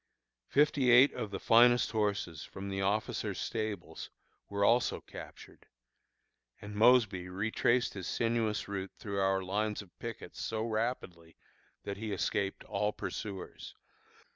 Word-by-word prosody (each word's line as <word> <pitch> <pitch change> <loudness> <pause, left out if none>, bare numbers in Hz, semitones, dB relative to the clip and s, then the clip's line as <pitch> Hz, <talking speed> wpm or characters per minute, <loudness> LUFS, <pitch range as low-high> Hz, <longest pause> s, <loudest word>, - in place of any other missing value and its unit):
Fifty 145 -3 +3
eight 125 +4 +7
of 110 - -4
the 100 - -5
finest 120 +1 +5
horses 100 -7 -1
from 100 0 -7
the 95 0 -2
officers' 100 0 -1
stables 110 -2 -4 0.4
were 100 0 +1
also 120 +3 +3
captured; - - -12 0.9
and 105 0 -8
Mosby 105 -5 +4
retraced 110 +5 +1
his 95 -3 -6
sinuous 115 -2 0
route 95 -1 -5
through 100 -2 -4
our 95 0 +2
lines 105 +3 -1
of 95 - -22
pickets 115 -1 -7
so 110 -1 -2
rapidly, 110 -7 -3 0.5
that 100 -1 -5
he 110 0 -4
escaped 100 0 -1
all 105 +1 -1
his - - -29
pursuers. 100 -4 -6
105 Hz, 135 wpm, -32 LUFS, 95-115 Hz, 0.9 s, eight